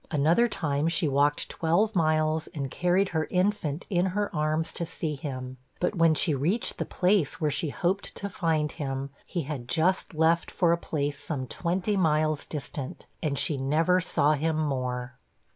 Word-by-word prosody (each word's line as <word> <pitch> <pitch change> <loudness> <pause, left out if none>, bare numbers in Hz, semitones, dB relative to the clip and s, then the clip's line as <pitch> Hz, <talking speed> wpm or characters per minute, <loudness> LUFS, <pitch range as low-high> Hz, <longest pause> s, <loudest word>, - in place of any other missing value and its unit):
Another 165 +10 +3
time 150 -7 -1
she 165 0 +2
walked 145 +1 +2
twelve 190 +7 +1
miles, 155 -1 +2
and 135 -3 -3
carried 180 +2 +2
her 160 -2 -1
infant 180 -5 0
in 180 -1 +1
her 205 0 -2
arms 155 +1 0
to - - -3
see 160 -1 -3
him, 130 -3 -6 0.2
but 180 - +1
when 165 -4 +4
she 155 +1 +1
reached 165 - 0
the - - -1
place 180 -4 +1
where 155 -3 +1
she 150 +2 -1
hoped 185 +7 -1
to 200 - -4
find 160 -5 0
him, 135 -2 -4 0.2
he 170 - -2
had 130 -4 -6
just 175 +2 +1
left 165 +2 +3
for 175 -3 +2
a - - +5
place 145 -4 -3
some 135 -5 -4
twenty 180 - -1
miles 155 -4 +1
distant, 140 -2 -6 0.2
and 145 -3 -1
she 150 - 0
never 160 +7 +2
saw 150 -4 +2
him 155 +2 0
more. 125 -4 -2
155 Hz, 175 wpm, -27 LUFS, 145-175 Hz, 0.2 s, a